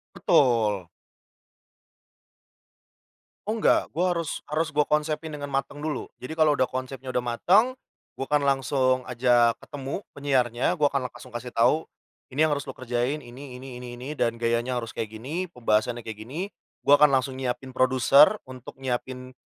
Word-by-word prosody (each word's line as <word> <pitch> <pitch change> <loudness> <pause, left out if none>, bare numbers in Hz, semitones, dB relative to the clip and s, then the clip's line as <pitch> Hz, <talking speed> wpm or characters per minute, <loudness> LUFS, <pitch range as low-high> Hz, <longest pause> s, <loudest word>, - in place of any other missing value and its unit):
Betul. 110 -8 +3 2.6
Oh 220 +2 0
enggak, 220 - +3
gue 175 +3 0
harus 170 -4 -2
harus 155 +2 -1
gue 150 -1 +2
konsepin 150 +1 -1
dengan 145 -1 -5
mateng 140 +1 -3
dulu. 155 -1 -3 0.2
Jadi 130 +5 -6
kalo 155 -2 +5
udah 130 -3 +1
konsepnya 130 0 -5
udah 125 -1 -1
mateng, 195 - +3 0.4
gua 135 - -6
akan 150 -1 +2
langsung 135 -1 +2
ajak 120 -1 +3
ketemu 140 +7 -6
penyiarnya, 135 +2 +1
gua 145 -1 +2
akan 130 -2 -1
langsung 120 - -14
kasih 120 +1 -5
tahu, 120 +7 +2 0.4
"Ini 145 +4 +2
yang 155 - +2
harus 140 -1 -4
lo 130 - -8
kerjain, 125 +3 -1
ini, 130 -1 -10
ini, 125 -1 -9
ini, 120 -1 -8
ini, 130 +4 -7
dan 115 -5 0
gayanya 120 +2 0
harus 115 -2 -5
kayak 110 - -3
gini, 160 +10 -4
pembahasannya 120 -2 0
kayak 110 -1 -7
gini." 135 +10 -6 0.4
Gua 145 +1 +6
akan 150 - +8
langsung 130 0 -2
nyiapin 130 0 -4
produser 130 - +5
untuk 130 0 -11
nyiapin, 130 0 -4
130 Hz, 160 wpm, -26 LUFS, 120-150 Hz, 2.6 s, akan